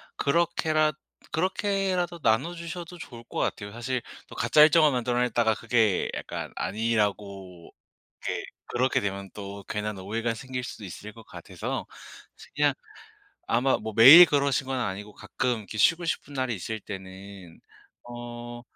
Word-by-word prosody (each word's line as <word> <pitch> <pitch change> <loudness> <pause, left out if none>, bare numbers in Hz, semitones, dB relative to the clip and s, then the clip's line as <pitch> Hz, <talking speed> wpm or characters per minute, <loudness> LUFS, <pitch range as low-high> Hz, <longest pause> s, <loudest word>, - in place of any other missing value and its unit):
그렇게라 155 0 +1 0.4
그렇게라도 185 -1 -1
나눠 145 +7 +1
주셔도 170 +1 -7
좋을 120 -8 -10
것 - - -5
같아요. 100 -1 -2
사실 120 +2 -3 0.3
또 - - -11
가짜 150 - +4
일정을 155 0 +6
만들어 125 -1 0
냈다가 120 -2 +2
그게 115 -4 +1
약간 - - -6
아니라고 100 -4 -2 0.5
이게 - - -3 0.2
그렇게 130 +2 +1
되면 100 -1 -4
또 100 -1 -8
괜한 105 -1 -3
오해가 115 +5 -2
생길 125 +2 -6
수도 110 - -9
있을 105 +3 -9
것 115 - -14
같아서 - - -6 0.5
이제 - - -15
그냥 - - +3 0.8
아마 130 +3 +2
뭐 110 0 -6
매일 140 +10 +11
그러신 140 -3 +1
건 135 -1 -1
아니고 105 -2 -4
가끔 125 +2 -2
이렇게 110 0 -9
쉬고 165 - +3
싶은 145 -3 -3
날이 130 -3 -1
있을 110 +3 -5
때는 95 -2 -10 0.4
어 120 0 -8
120 Hz, 310 characters per minute, -27 LUFS, 105-145 Hz, 0.8 s, 매일